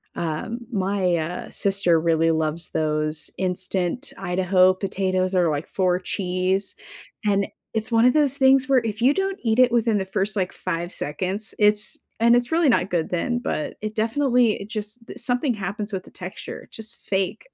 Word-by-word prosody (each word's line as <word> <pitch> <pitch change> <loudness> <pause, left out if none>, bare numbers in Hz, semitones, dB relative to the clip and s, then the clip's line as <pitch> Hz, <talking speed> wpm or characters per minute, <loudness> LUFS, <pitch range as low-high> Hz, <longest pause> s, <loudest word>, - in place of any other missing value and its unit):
Um, 170 +9 -3
my, 190 -3 +1
uh, 165 +3 -4
sister 195 -4 +2
really 165 0 +2
loves 160 +1 -1
those 155 -1 0
instant 185 +5 -1
Idaho 185 0 +3
potatoes, 185 -1 -1
or 175 -3 +3
like 150 +1 -2
four 180 -1 +1
cheese. 185 +1 -1 0.5
And 200 -1 +2 0.3
it's 220 +1 -2
one 230 0 +4
of 250 - +5
those 290 -3 +3
things 265 0 +4
where 265 -3 +4
if 220 0 -4
you 265 +4 +5
don't 390 +2 -1
eat 225 +1 +1
it 250 -1 +6
within 230 -2 +2
the 190 - -2
first 195 +2 -1
like, 185 -3 -1
5 170 +1 -4
seconds, 185 +8 -3
it's 210 0 +3 0.2
and 235 +1 +5
it's 245 +4 +1
really 330 -2 +3
not 195 -6 +2
good 170 -2 0
then, 240 +8 -1
but 155 -10 -3
it 215 0 -4
definitely 235 -1 +2
eh, - - -6
just 215 +1 -5
something 245 +2 +2
happens 205 +2 -4
with 185 - -3
the - - -16
texture. 185 0 -8
Just 220 +1 -5
fake. 190 - -2
195 Hz, 175 wpm, -23 LUFS, 180-230 Hz, 0.5 s, it